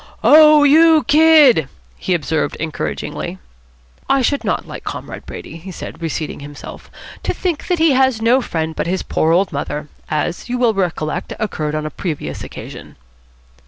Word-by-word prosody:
"Oh, 305 -1 +7
you 315 +2 +6
Kid!" 295 - +5 0.3
he 185 - 0
observed 160 -1 -1
encouragingly. 160 -1 -4 0.7
"I 275 -1 +3
should 285 +3 0
not - - -2
like - - -8
Comrade - - -7
Brady," - - -9
he 175 +4 -11
said, 170 - -9
reseating 160 -1 -4
himself, 145 0 -10 0.3
"to - - -2
think 350 -5 -3
that 360 - +1
he 325 -1 +4
has 260 -3 +2
no 235 +4 +3
friend 160 -7 -3
but - - -2
his 185 +2 -1
poor 160 - 0
old 180 +1 +2
mother, 150 +1 -4 0.2
as, 155 +8 -3
you 250 - -1
will 240 -2 +2
recollect, 175 -6 -2
occurred 155 -8 -3
on 155 0 -3
a 155 - -4
previous 150 - -5
occasion." - - -10
190 Hz, 160 wpm, -18 LUFS, -, 0.7 s, Oh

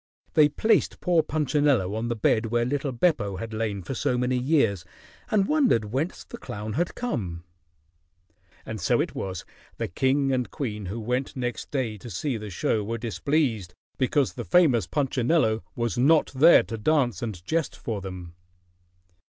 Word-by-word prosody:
They 150 -1 +6
placed 220 +8 +1
poor 175 -3 +3
Punchinello 145 -10 +1
on 110 +2 -2
the 120 - -1
bed 110 +1 +1
where 120 +1 +1
little 140 +2 -1
Beppo 120 - +1
had 110 +4 -6
lain 110 -3 -2
for 95 - -5
so 125 0 0
many 125 +1 0
years, 125 - +2 0.5
and 205 -4 +2
wondered 240 - +2
whence 150 +7 -2
the - - -10
clown 105 +1 -6
had 170 +7 -1
come. 95 - -3 1.2
And 110 -3 -6
so - - +2
it - - -1
was 95 -2 -5 0.3
the - - -2
king 135 - +1
and 125 -2 0
queen 105 - -4
who 105 +6 -4
went 125 +4 -2
next 125 -2 -4
day 120 -7 -2
to 120 - -9
see 125 - -2
the 105 -1 -7
show 105 +3 0
were 115 +3 -3
displeased 115 - -1 0.2
because 130 +1 +1
the - - -5
famous 135 - +3
Punchinello 130 -4 +1
was 120 0 -1
not 150 +5 +4
there 155 +6 +7
to 115 -2 -6
dance 125 - +1
and 100 -7 -5
jest 160 - -1
for 110 -4 -4
them. 90 -3 -8
120 Hz, 170 wpm, -26 LUFS, 105-145 Hz, 1.2 s, there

